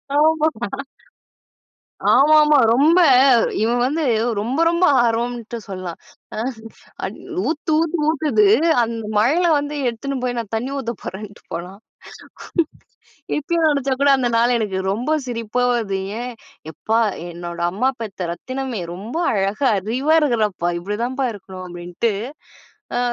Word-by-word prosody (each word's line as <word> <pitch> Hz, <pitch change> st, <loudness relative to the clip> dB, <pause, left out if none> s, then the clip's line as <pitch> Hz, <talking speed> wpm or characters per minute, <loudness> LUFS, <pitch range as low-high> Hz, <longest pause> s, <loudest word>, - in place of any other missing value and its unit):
ஆமா, 310 Hz, +1 st, +4 dB, 1.7 s
ஆமாமா 300 Hz, +1 st, +6 dB
ரொம்ப, 300 Hz, +8 st, +4 dB, 0.6 s
இவன் 235 Hz, +2 st, +1 dB
வந்து 310 Hz, +4 st, -1 dB, 0.3 s
ரொம்ப 245 Hz, +9 st, -1 dB
ரொம்ப 340 Hz, +2 st, +2 dB, 0.2 s
ஆர்வம்ட்டு 235 Hz, 0 st, -1 dB
சொல்லலாம். 185 Hz, -4 st, -6 dB, 0.4 s
அ -, -, -5 dB, 0.7 s
அட் -, -, -7 dB, 0.3 s
ஊத்து 315 Hz, +1 st, -2 dB
ஊத்துன்னு 325 Hz, -2 st, 0 dB
ஊத்துது, 315 Hz, +6 st, +2 dB, 0.4 s
அந்த 230 Hz, 0 st, -3 dB, 0.2 s
மழைல 295 Hz, +12 st, +3 dB
வந்து 290 Hz, +1 st, -3 dB
எடுத்துனு 260 Hz, +4 st, -3 dB
போய் 245 Hz, -1 st, -1 dB
நான் 230 Hz, -4 st, -4 dB
தண்ணீ 245 Hz, +5 st, -2 dB
ஊத்த 235 Hz, -3 st, -3 dB
போறேன்னுட்டு 205 Hz, +2 st, -8 dB
போனான். 180 Hz, +4 st, -6 dB, 1.6 s
இப்பயும் 325 Hz, +2 st, 0 dB
நெனைச்சா 275 Hz, -3 st, +1 dB
கூட 285 Hz, -, +5 dB
அந்த 245 Hz, -2 st, 0 dB
நாள் 240 Hz, +2 st, +3 dB
எனக்கு 205 Hz, -4 st, -2 dB
ரொம்ப 240 Hz, +8 st, -3 dB, 0.2 s
சிரிப்பா 235 Hz, 0 st, -2 dB
வருது, 205 Hz, -5 st, -1 dB, 0.2 s
ஏன் 250 Hz, +1 st, -5 dB, 0.4 s
"எப்பா 220 Hz, +9 st, 0 dB, 0.3 s
என்னோட 170 Hz, 0 st, -7 dB
அம்மா 250 Hz, +8 st, +1 dB
பெத்த 190 Hz, -5 st, -5 dB
ரத்தினமே 255 Hz, +1 st, -5 dB
ரொம்ப 210 Hz, -, -7 dB, 0.2 s
அழகா 205 Hz, +6 st, +1 dB
அறிவா 250 Hz, +10 st, 0 dB
இருக்கிறப்பா, 215 Hz, -, +1 dB
இப்படிதான்ப்பா 235 Hz, +8 st, -2 dB
இருக்கணும்" 190 Hz, -2 st, -9 dB
அப்டின்ட்டு, 175 Hz, +5 st, -2 dB, 0.8 s
அ -, -, +1 dB
240 Hz, 120 wpm, -20 LUFS, 205-285 Hz, 1.7 s, ஆமாமா